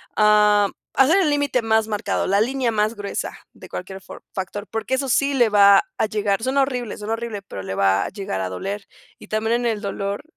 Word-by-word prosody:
Ah, 210 -1 +4 0.3
hacer 295 +8 +5
el 330 - +2
límite 285 -4 +1
más 220 0 +2
marcado, 210 -2 -1
la 200 +2 +3
línea 255 +1 0
más 215 +1 0
gruesa 205 -2 -5 0.2
de - - -14
cualquier 190 +1 -7
for - - -12
factor, 200 +2 -5
porque 225 +4 -1
eso 270 +1 -2
sí 280 +3 +2
le 240 -4 +4
va 200 -1 +6 0.2
a - - +3
llegar. 210 -1 -1
Suena 270 +2 +2
horrible, 250 -5 -3
suena 210 +2 -3
horrible, 225 -3 -4
pero 100 - -8
le 95 - -5
va 95 0 +2
a - - -4
llegar 195 - -4
a 95 - -2
doler, 195 - -5 0.3
y - - -13
también 220 +1 0
en 240 - -3
el 220 -3 -1
dolor 200 +1 -4
210 Hz, 215 wpm, -22 LUFS, 200-240 Hz, 0.3 s, va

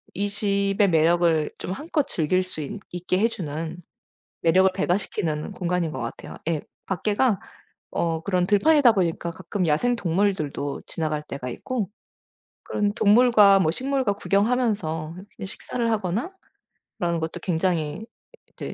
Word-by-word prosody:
이 200 +2 0
집의 200 -1 +1
매력을 165 -1 +3
좀 - - -5
한껏 300 - -1
즐길 175 +3 +1
수 185 -4 -6
있 205 +9 -5
있게 180 +1 -1
해주는 165 -7 -2 0.6
매력을 185 +3 +4
배가시키는 175 -4 -1
공간인 180 -3 -1
것 - - -5
같아요. 115 -1 -6
예 160 -3 0 0.2
밖에가 205 +3 +1 0.5
어 165 -1 0
그런 180 -1 +1
들판이다 255 - +5
보니까 170 -4 0
가끔 180 +2 -3
야생동물들도 170 - 0
지나갈 155 -2 -2
때가 140 -4 -6
있고 215 - -3 0.8
그런 205 -1 0
동물과 210 -2 +6
뭐 160 -4 +2
식물과 260 +1 0
구경하면서 200 -7 0
이렇게 195 +1 -9
식사를 230 +4 -3
하거나 215 - -1 0.7
그런 170 -1 0
것도 160 +2 -4
굉장히 170 +1 -1 0.5
이제 - - -6
185 Hz, 300 characters per minute, -24 LUFS, 165-205 Hz, 0.8 s, 동물과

